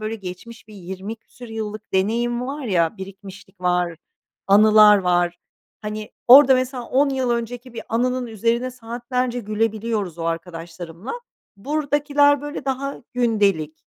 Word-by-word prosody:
böyle 215 Hz, +1 st, -3 dB
geçmiş 210 Hz, +4 st, -10 dB
bir 210 Hz, -, -13 dB
20 190 Hz, +3 st, -7 dB
küsur 240 Hz, +1 st, -14 dB
yıllık 215 Hz, -1 st, -6 dB
deneyim 235 Hz, +5 st, 0 dB
var 285 Hz, +2 st, -5 dB
ya, 180 Hz, -4 st, +1 dB
birikmişlik 195 Hz, 0 st, -11 dB
var, 180 Hz, -2 st, 0 dB, 0.5 s
anılar 210 Hz, +1 st, +7 dB
var. 175 Hz, -1 st, +1 dB, 0.4 s
Hani, 210 Hz, 0 st, -5 dB, 0.2 s
orada 265 Hz, +1 st, +9 dB
mesela 255 Hz, -1 st, -2 dB
10 275 Hz, +4 st, +2 dB
yıl 260 Hz, -2 st, -1 dB
önceki 240 Hz, +1 st, -4 dB
bir 230 Hz, -, -6 dB
anının 250 Hz, +2 st, 0 dB
üzerine 235 Hz, +3 st, -1 dB
saatlerce 245 Hz, +1 st, -3 dB
gülebiliyoruz 215 Hz, -4 st, -2 dB
o 165 Hz, -, -4 dB
arkadaşlarımla. 165 Hz, +3 st, -6 dB, 0.4 s
Buradakiler 290 Hz, +2 st, +2 dB
böyle 290 Hz, -2 st, -6 dB
daha 275 Hz, +1 st, -3 dB
gündelik, 200 Hz, -10 st, 0 dB
225 Hz, 130 wpm, -22 LUFS, 190-250 Hz, 0.5 s, orada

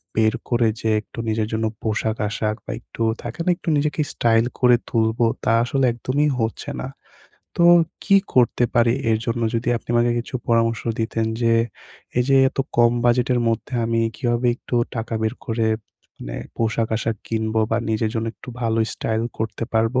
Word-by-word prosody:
বের 110 Hz, -1 st, +3 dB
করে 120 Hz, -2 st, +3 dB
যে 110 Hz, -, 0 dB
একটু 115 Hz, -, -12 dB
নিজের 110 Hz, 0 st, 0 dB
জন্য 110 Hz, 0 st, 0 dB, 0.2 s
পোশাক-আশাক 110 Hz, 0 st, -1 dB
বা -, -, -5 dB
একটু 115 Hz, -, -6 dB, 0.2 s
থাকে 160 Hz, -, -7 dB
না, -, -, +2 dB
একটু -, -, -4 dB
নিজেকে 150 Hz, 0 st, 0 dB
স্টাইল 115 Hz, 0 st, +3 dB
করে 125 Hz, -1 st, +6 dB
তুলবো 115 Hz, 0 st, +2 dB, 0.2 s
তা 110 Hz, -, +3 dB
আসলে 135 Hz, +2 st, +1 dB
একদমই 145 Hz, +5 st, 0 dB
হচ্ছে 110 Hz, 0 st, -2 dB
না। 130 Hz, -, -4 dB, 0.7 s
তো 170 Hz, -, +4 dB, 0.4 s
কি 200 Hz, -, +5 dB, 0.2 s
করতে 125 Hz, -1 st, +3 dB
পারি 120 Hz, -1 st, +4 dB, 0.2 s
এর 110 Hz, -, +3 dB
জন্য, 115 Hz, 0 st, -1 dB
যদি 115 Hz, +1 st, -1 dB
আপনি -, -, -10 dB
আমাকে 120 Hz, 0 st, +3 dB
কিছু 120 Hz, +2 st, -6 dB
পরামর্শ 115 Hz, -1 st, +2 dB, 0.2 s
দিতেন 115 Hz, 0 st, -1 dB, 0.2 s
যে 115 Hz, 0 st, +3 dB, 0.7 s
এইযে 135 Hz, +2 st, +3 dB
এত -, -, -15 dB, 0.2 s
কম 120 Hz, 0 st, +5 dB
বাজেটের 125 Hz, 0 st, +3 dB
মধ্যে 115 Hz, +3 st, -2 dB
আমি 115 Hz, 0 st, +1 dB, 0.2 s
কিভাবে 120 Hz, +1 st, 0 dB
একটু 125 Hz, -, -7 dB, 0.2 s
টাকা 115 Hz, 0 st, -3 dB
বের 110 Hz, 0 st, 0 dB
করে 115 Hz, -1 st, 0 dB, 0.5 s
মানে -, -, -6 dB, 0.2 s
পোশাক-আশাক 115 Hz, 0 st, 0 dB
কিনবো 110 Hz, 0 st, 0 dB
বা 115 Hz, -, +2 dB
নিজের 110 Hz, 0 st, 0 dB
জন্য 115 Hz, 0 st, -1 dB
একটু -, -, -15 dB
ভালো 115 Hz, 0 st, +1 dB
স্টাইল 110 Hz, 0 st, -2 dB, 0.2 s
করতে 110 Hz, +1 st, -3 dB
পারবো। 115 Hz, +3 st, +2 dB
115 Hz, 170 wpm, -22 LUFS, 110-120 Hz, 0.7 s, করে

